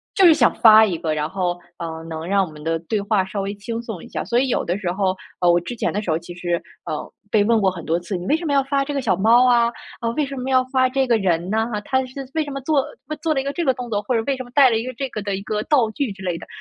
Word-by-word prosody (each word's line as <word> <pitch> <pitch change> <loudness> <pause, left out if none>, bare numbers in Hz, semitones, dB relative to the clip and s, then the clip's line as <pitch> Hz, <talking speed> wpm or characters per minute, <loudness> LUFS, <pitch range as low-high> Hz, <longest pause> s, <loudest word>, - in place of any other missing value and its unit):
就 390 - +5
是 335 - +9
想 - - +3
发 220 -1 +8
一 180 -5 -2
个， 160 -2 -2
然 150 0 -2
后， 175 -1 -2 0.2
呃， 160 -1 -5
能 160 0 -6
让 195 +1 +2
我 - - -10
们 150 -1 -12
的 165 +1 -1
对 200 +6 -2
话 200 -2 +1
稍 195 +1 -4
微 195 +1 -3
轻 225 +3 -5
松 225 -7 -7
一 - - -11
下。 - - -4
所 240 - +1
以 265 - +1
有 - - 0
的 175 +2 -1
时 195 -4 -3
候， 190 +1 0 0.3
呃 175 -1 +5
我 175 - +4
之 240 +8 -6
前 - - -1
的 205 - -2
时 195 - -6
候， 155 - +2
其 170 +1 -9
实， 175 -1 -2 0.2
呃， 150 - -5 0.2
被 210 -1 +3
问 225 +1 +3
过 195 - +3
很 180 -3 -7
多 165 +2 0
次： 175 +3 -5
“你 175 0 -5
为 310 - +3
什 335 - -7
么 290 - 0
要 275 -1 +3
发 275 0 0
这 290 - -4
个 275 - -1
小 200 -8 +1
猫 230 +6 +5
啊？ 235 -1 +4 0.3
啊， 230 - -3
为 300 - +1
什 275 0 -7
么 255 +1 -4
要 255 -1 +4
发 260 -1 +3
这 265 +1 +1
个 235 -3 +3
人 180 -3 0
呢 220 +1 +1
哈？ 210 - -2
它 260 +4 0
是 265 +2 -8
为 315 - +2
什 290 - -6
么 275 0 -5
做 280 -1 +1 0.4
做 320 -2 +1
了 270 - 0
一 - - -6
个 280 - -2
这 340 +3 -2
个 265 - +3
动 250 -1 -7
作？ 205 -2 -1
或 225 +4 -1
者 225 - +1
为 275 -2 0
什 255 - -6
么 - - -15
带 275 -3 +7
了 225 - +1
一 225 - -3
个 255 - -4
这 265 +2 -4
个 215 - -5
的 200 -1 -2
一 195 - -5
个 210 0 -2
道 245 -6 +2
具？” 275 0 -2
之 190 - -11
类 175 -2 -2
的。 - - -11
220 Hz, 360 characters per minute, -21 LUFS, 180-260 Hz, 0.4 s, 是